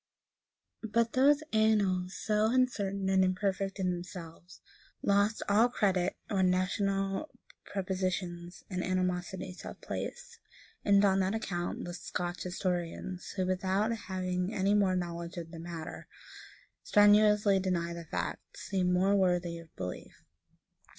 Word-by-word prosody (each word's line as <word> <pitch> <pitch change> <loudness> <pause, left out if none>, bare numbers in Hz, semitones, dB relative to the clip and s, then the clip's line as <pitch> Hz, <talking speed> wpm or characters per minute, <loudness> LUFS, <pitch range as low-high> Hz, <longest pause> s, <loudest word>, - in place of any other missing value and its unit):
] - - -57
But 230 0 +3
those 285 +3 +4
annals, 200 -4 +2
so 215 0 +1
uncertain 205 -6 +1
and 190 0 +4
imperfect 195 +1 0
in 185 -1 +1
themselves, 175 -1 -8 0.4
lose 200 +2 +2
all 220 +4 +5
credit 190 -5 +1
when 190 -3 +2
national 195 +6 0 0.4
prepossessions 185 -2 -3
and 185 -2 -3
animosities 185 0 -2
have - - -8
place; - - -6 0.4
and, 200 0 +5
on 195 -1 +3
that 190 +2 +1
account, 175 -6 -3
the 175 - -5
Scotch 175 0 -4
historians, 180 0 -3
who, 185 -2 0
without 190 +4 +1
having 185 -3 -2
any 195 -1 +1
more 195 -3 +3
knowledge 170 -1 -4
of 165 -1 -6
the 165 - -8
matter, 165 -1 -7 0.7
strenuously 210 -1 +5
deny 175 -2 -1
the 170 -1 -7
fact, - - -5
seem 185 -3 0
more 190 +3 +3
worthy 180 -3 +1
of 165 -1 -15
belief. 90 0 -7
185 Hz, 130 wpm, -31 LUFS, 180-200 Hz, 0.7 s, all